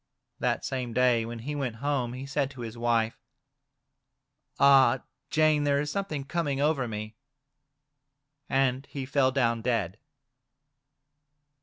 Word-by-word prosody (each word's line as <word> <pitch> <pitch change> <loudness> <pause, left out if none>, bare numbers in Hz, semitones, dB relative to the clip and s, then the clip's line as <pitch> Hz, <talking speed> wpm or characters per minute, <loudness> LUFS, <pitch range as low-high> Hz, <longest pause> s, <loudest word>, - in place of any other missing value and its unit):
That - - 0
same 125 -3 -3
day, 125 -2 +3
when 120 0 -6
he 130 +6 -5
went 135 -6 -3
home, 130 -1 -1
he 130 +2 -6
said 140 -1 -1
to 130 -3 -10
his 115 -1 -6
wife: 115 -1 0 0.7
" - - -42
Ah, 135 -2 +6 0.3
Jane, 155 -1 +3
there 140 -1 +2
is 150 0 -2
something 175 -8 -3
coming 145 -2 -2
over 145 -3 +1
me," 110 0 -6 1.3
and 135 0 +1
he 135 -2 -5
fell 135 -1 +2
down 115 -4 +1
dead. 110 -5 -1
130 Hz, 135 wpm, -28 LUFS, 120-140 Hz, 1.3 s, Ah